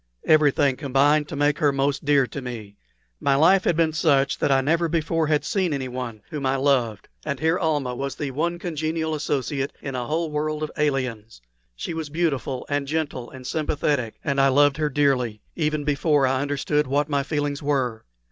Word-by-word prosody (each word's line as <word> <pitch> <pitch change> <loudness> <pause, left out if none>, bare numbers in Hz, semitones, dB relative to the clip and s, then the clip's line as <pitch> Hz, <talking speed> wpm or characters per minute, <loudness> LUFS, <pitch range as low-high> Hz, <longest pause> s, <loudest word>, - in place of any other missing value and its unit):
Everything 145 -3 +4
combined 145 +2 +2
to 155 - -6
make 145 +1 +1
her 145 -2 +3
most 140 +1 0
dear 140 -2 +4
to 125 +4 -7
me. 115 -5 -7 0.4
My 140 - +2
life 185 +7 +4
had 170 - +2
been 160 -2 +2
such 140 -4 +2
that - - +1
I 135 - +5
never 165 +5 +1
before 165 0 0
had 150 -1 +1
seen 185 -5 0
anyone 125 -5 -5
whom 150 -2 -4
I 130 0 +1
loved; 130 -6 +1 0.2
and 140 -3 -3
here 160 +3 +1
Almah 150 -7 0
was 135 +2 -4
the 145 -2 -4
one 170 +6 -1
congenial 160 -1 -2
associate 145 -1 -2
in 135 - -6
a 125 -2 -3
whole 160 0 -1
world 155 +1 -2
of 155 - -3
aliens: 130 - -2 0.4
she - - -5
was 160 -2 -4
beautiful 140 -5 -1
and 145 -1 -1
gentle 145 -5 -3
and 130 -1 -11
sympathetic, 145 -5 -1
and 140 -1 +1
I 135 - +5
loved 145 +1 +4
her 155 -1 0
dearly, 130 -6 +1
even 155 -2 -1
before 145 0 +2
I 130 0 +1
understood 145 +1 0
what 145 +2 +1
my 145 -2 +1
feelings 145 0 -2
were. 130 -6 -1
145 Hz, 190 wpm, -24 LUFS, 135-155 Hz, 0.4 s, I